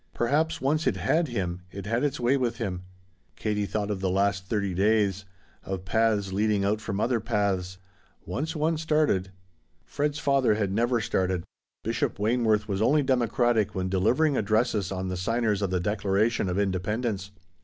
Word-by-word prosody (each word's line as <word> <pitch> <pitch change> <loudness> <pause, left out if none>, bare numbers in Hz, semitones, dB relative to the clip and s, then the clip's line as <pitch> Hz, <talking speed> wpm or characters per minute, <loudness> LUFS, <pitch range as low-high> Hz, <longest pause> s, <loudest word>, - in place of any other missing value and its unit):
Perhaps 155 +6 +1
once 150 +3 +1
it - - +2
had 165 +1 +1
him 90 -7 -3
it 100 0 -8
had 115 +5 0
its 145 -3 -1
way 125 +3 +3
with 125 -4 -1
him. 95 -7 -3 0.5
Katie 105 -2 -1
thought 105 0 -2
of 100 - -2
the 95 - 0
last 95 0 0
thirty 100 -3 -1
days 100 0 +2 0.4
of 95 -1 -5
paths 105 -1 +1
leading 105 0 +1
out 105 +2 0
from 100 -1 -3
other 120 +1 +1
paths. 100 -5 -1 0.5
Once 155 +6 -3
one 160 +1 +1
started 150 - +1 0.5
Fred's 145 0 -1
father 140 -6 +2
had 100 -3 -1
never 120 +3 +1
started. 95 -3 0 0.4
Bishop - - -1
Wayneworth 110 0 +1
was 100 -1 -2
only 145 +6 +4
democratic 120 -4 +1
when 95 0 -1
delivering 125 +11 +2
addresses 110 -2 +1
on 95 -1 -3
the 90 - -2
signers 110 +1 0
of 100 - 0
the 90 0 0
Declaration 105 +2 0
of 90 - -1
Independence. 100 +1 -1
105 Hz, 165 wpm, -27 LUFS, 95-120 Hz, 0.5 s, only